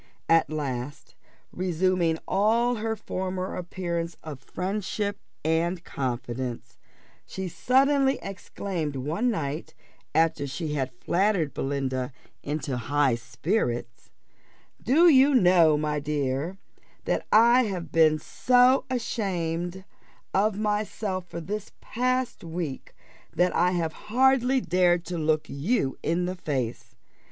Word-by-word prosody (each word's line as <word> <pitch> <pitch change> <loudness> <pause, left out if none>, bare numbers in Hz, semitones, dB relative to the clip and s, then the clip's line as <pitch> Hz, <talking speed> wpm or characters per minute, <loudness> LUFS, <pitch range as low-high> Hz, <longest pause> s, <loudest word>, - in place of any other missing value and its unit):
At 165 0 +4
last, 140 -3 -4 0.4
resuming 180 -2 +1
all 230 +5 +2
her 220 +1 -2
former 185 -2 -4
appearance 170 -2 -4
of 150 -4 -7
friendship 200 +5 -3 0.3
and 165 +2 0
confidence, 120 - -4 0.5
she 190 -1 -5
suddenly 270 - +3
exclaimed 185 -5 -4
one 155 - -1
night 160 -5 -3 0.4
after 160 -3 +2
she 150 +3 -4
had 130 -3 -1
flattered 175 - 0
Belinda 135 -2 -2 0.3
into 145 -3 -3
high 135 +2 +2
spirits 120 - -2 0.7
"Do 310 +9 +5
you 280 -2 +6
know, 175 -8 +5
my 150 0 -1
dear, 145 +3 -2 0.5
that - - -1
I 235 +3 +6
have 185 -5 -4
been 155 -1 +5
so 250 - +3
ashamed 185 -7 -2 0.5
of 205 +1 +2
myself 210 -3 -2
for 170 0 -6
this 200 +5 -4 0.7
week 165 -4 -5
past, - - -29 0.4
that 180 +2 +2
I 175 +1 +4
have 165 -3 -1 0.2
hardly 260 +2 +3
dared 175 -3 +2
to 175 -2 -4
look 155 0 +1
you 140 - 0
in 175 +2 0
the 180 - -2
face. 120 -8 -4
170 Hz, 115 wpm, -26 LUFS, 145-205 Hz, 0.7 s, you